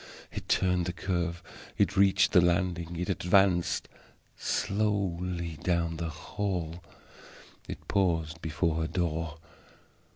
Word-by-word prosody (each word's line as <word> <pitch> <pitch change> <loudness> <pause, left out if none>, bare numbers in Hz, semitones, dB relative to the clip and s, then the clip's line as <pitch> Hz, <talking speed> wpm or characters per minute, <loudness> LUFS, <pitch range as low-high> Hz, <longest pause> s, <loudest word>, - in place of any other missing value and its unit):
It - - -7
turned 90 -2 +2
the 90 - -2
curve; 85 -2 -2 0.3
it - - +2
reached 100 0 +4
the 90 - +7
landing; 85 -1 +1
it 90 +2 -2
advanced 90 -2 +2 0.5
slowly 90 -5 -1
down 85 -2 0
the 85 0 -3
hall; 85 +1 -3 0.8
it - - -8
paused 85 -4 +1
before 80 +1 0
her 80 -1 0
door. 80 -3 -2
85 Hz, 110 wpm, -29 LUFS, 85-95 Hz, 0.8 s, the